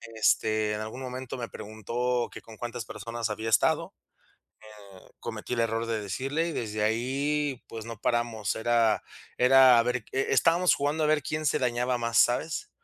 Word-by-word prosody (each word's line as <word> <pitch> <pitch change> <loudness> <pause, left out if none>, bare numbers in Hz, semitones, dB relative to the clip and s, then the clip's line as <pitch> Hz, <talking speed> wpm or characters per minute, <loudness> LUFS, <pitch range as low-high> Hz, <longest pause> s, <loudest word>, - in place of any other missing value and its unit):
Este, 110 -1 +2
en 105 - -3
algún 110 +4 -6
momento 130 0 -6
me 115 -2 -5
preguntó 120 +3 -2
que - - -9
con 110 -1 -14
cuántas 120 -2 -5
personas 115 +2 -4
había 110 +2 -3
estado, 110 - +2 0.7
eh, 110 - -13 0.5
cometí 110 +1 -6
el 115 - -1
error 115 0 0
de 115 -1 -1
decirle 135 - -2
y - - -4
desde 110 -4 -3
ahí, 135 +5 -1
pues, 110 -1 -7
no 115 -1 -6
paramos. 120 -4 -1
Era 115 -1 +2 0.4
era 130 -1 +7
a - - +5
ver 125 -2 -1
que 135 - -2
eh, - - -3
estábamos 170 +2 +4
jugando 150 +2 0
a - - +3
ver 155 -1 +2
quién 155 +3 -3
se - - +2
dañaba 125 0 0
más, 115 -1 0
¿sabes? 160 - +2
120 Hz, 180 wpm, -28 LUFS, 110-130 Hz, 0.7 s, era